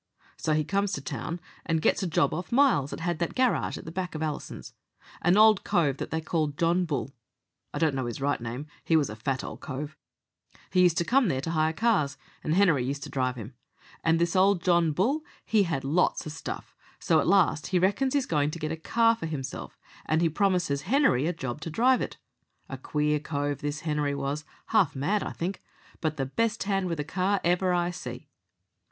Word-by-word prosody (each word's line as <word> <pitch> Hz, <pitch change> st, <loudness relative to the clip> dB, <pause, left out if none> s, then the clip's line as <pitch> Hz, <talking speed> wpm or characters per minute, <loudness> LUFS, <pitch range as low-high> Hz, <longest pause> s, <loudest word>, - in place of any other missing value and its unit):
"So 155 Hz, -, -1 dB
he 155 Hz, 0 st, +2 dB
comes 200 Hz, +4 st, 0 dB
to 140 Hz, -, -3 dB
town 160 Hz, +5 st, -4 dB, 0.2 s
and 165 Hz, -2 st, 0 dB
gets -, -, +2 dB
a 190 Hz, -, -1 dB
job 145 Hz, -4 st, +2 dB
off 175 Hz, -, -5 dB
Miles 235 Hz, -, +4 dB
that -, -, -6 dB
had 175 Hz, -1 st, -1 dB
that 170 Hz, -, -2 dB
garage 255 Hz, -2 st, +1 dB
at -, -, -10 dB
the 160 Hz, -, -6 dB
back 180 Hz, -1 st, -4 dB
of 155 Hz, -, -2 dB
Allison's. 150 Hz, -2 st, -5 dB, 0.5 s
An 175 Hz, +3 st, +4 dB
old 215 Hz, -2 st, +6 dB
cove 145 Hz, -6 st, +1 dB
that -, -, -5 dB
they 160 Hz, -, -1 dB
called 155 Hz, -3 st, -1 dB
John 170 Hz, +2 st, +2 dB
Bull 140 Hz, -4 st, -3 dB, 0.6 s
I -, -, -5 dB
don't 160 Hz, -3 st, +2 dB
know 130 Hz, -2 st, -2 dB
his 120 Hz, -, -5 dB
right 140 Hz, -2 st, 0 dB
name, 120 Hz, +5 st, -5 dB, 0.2 s
he 165 Hz, -, +2 dB
was 145 Hz, -7 st, +2 dB
a -, -, -6 dB
fat 130 Hz, +4 st, -2 dB
old -, -, -7 dB
cove 145 Hz, +1 st, -6 dB, 0.8 s
he 180 Hz, -, +4 dB
used 175 Hz, -2 st, +4 dB
to 170 Hz, -, +1 dB
come 255 Hz, +4 st, +3 dB
there 135 Hz, -7 st, 0 dB
to 165 Hz, -, -3 dB
hire 155 Hz, -1 st, +2 dB
cars, 160 Hz, -, +1 dB, 0.3 s
and 155 Hz, -, 0 dB
Henery 175 Hz, -9 st, +4 dB
used 140 Hz, +2 st, -3 dB
to -, -, -8 dB
drive 130 Hz, -2 st, 0 dB
him. 115 Hz, +1 st, -8 dB, 0.5 s
And 165 Hz, 0 st, +3 dB
this 170 Hz, +1 st, 0 dB
old 190 Hz, -1 st, +4 dB
John 170 Hz, -3 st, +3 dB
Bull 235 Hz, -, +1 dB, 0.2 s
he 210 Hz, -3 st, +3 dB
had 150 Hz, -5 st, -1 dB
lots 155 Hz, +7 st, +1 dB
of 155 Hz, -, -5 dB
stuff, 160 Hz, -, -7 dB, 0.2 s
so -, -, +2 dB
at -, -, 0 dB
last 180 Hz, -6 st, +3 dB
he 185 Hz, -, +1 dB
reckons 205 Hz, +10 st, +1 dB
he's 280 Hz, -2 st, +2 dB
going 150 Hz, -2 st, +1 dB
to 155 Hz, -, -5 dB
get 155 Hz, -1 st, -3 dB
a 160 Hz, -, -3 dB
car 230 Hz, +7 st, +3 dB
for 220 Hz, -7 st, -5 dB
himself, 140 Hz, -4 st, -6 dB, 0.3 s
and 160 Hz, +2 st, +2 dB
he 165 Hz, -, +3 dB
promises 180 Hz, -5 st, +1 dB
Henery 220 Hz, -, +3 dB
a -, -, +2 dB
job 135 Hz, -4 st, -5 dB
to 165 Hz, -, -4 dB
drive 250 Hz, +9 st, +3 dB
it. -, -, -4 dB, 0.5 s
A 135 Hz, -, -4 dB
queer 150 Hz, +2 st, 0 dB
cove 145 Hz, -1 st, -2 dB
this 145 Hz, 0 st, -3 dB
Henery 150 Hz, -2 st, -1 dB
was 140 Hz, +2 st, -3 dB, 0.2 s
half 200 Hz, -10 st, +3 dB
mad, 160 Hz, +10 st, 0 dB
I -, -, -4 dB
think, 180 Hz, +3 st, -4 dB, 0.4 s
but 155 Hz, -2 st, -2 dB
the 135 Hz, -, -1 dB
best 230 Hz, -, -1 dB
hand 195 Hz, -1 st, 0 dB
with 165 Hz, -3 st, -3 dB
a -, -, 0 dB
car 185 Hz, +5 st, 0 dB
ever 180 Hz, +2 st, +2 dB
I 175 Hz, 0 st, +1 dB
see." 180 Hz, -, -7 dB
160 Hz, 220 wpm, -27 LUFS, 145-185 Hz, 0.8 s, old